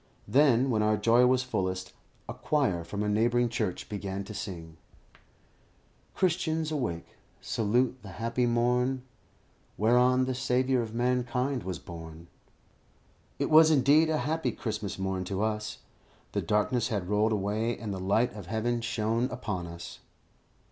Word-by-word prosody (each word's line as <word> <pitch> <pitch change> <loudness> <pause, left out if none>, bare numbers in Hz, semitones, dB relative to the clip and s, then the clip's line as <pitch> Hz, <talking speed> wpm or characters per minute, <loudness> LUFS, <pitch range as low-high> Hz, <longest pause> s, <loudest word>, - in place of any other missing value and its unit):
Then, 130 +1 +4
when 110 -2 +1
our 105 0 +2
joy 115 +4 +4
was 130 0 +3
fullest, 95 -7 -3 0.3
a - - -5
choir 125 - 0
from 100 +5 -4
a - - -1
neighbouring 120 +3 +2
church 110 -6 -3
began 100 -1 -4
to 105 - -9
sing 85 -5 -7 1.4
"Christians, 160 -3 0
awake, 120 - -2 0.3
salute 120 +4 0
the 100 -3 -10
happy 115 +2 0
morn, 125 +2 +1 0.7
Whereon 125 +4 +4
the 130 - -1
Saviour 130 0 +1
of 115 -1 -6
mankind 125 +2 0
was 95 -2 -4
born." 80 +1 -10 1.1
It - - -2
was 155 +1 +8
indeed, 150 +2 +4
a 155 - +1
happy 160 +2 0
Christmas 105 -4 -4
morn 95 -1 -2
to 95 +2 -2
us. 105 -1 -3 0.5
The - - -1
darkness 110 +4 +1
had 100 -7 -2
rolled 105 +2 +2
away, 110 +3 -1
and 105 -4 -5
the 95 - -5
light 105 +6 +1
of 100 -5 -9
heaven 115 +3 -1
shone 115 0 0
upon 105 -9 -4
us. 85 0 -9
115 Hz, 145 wpm, -29 LUFS, 100-125 Hz, 1.4 s, was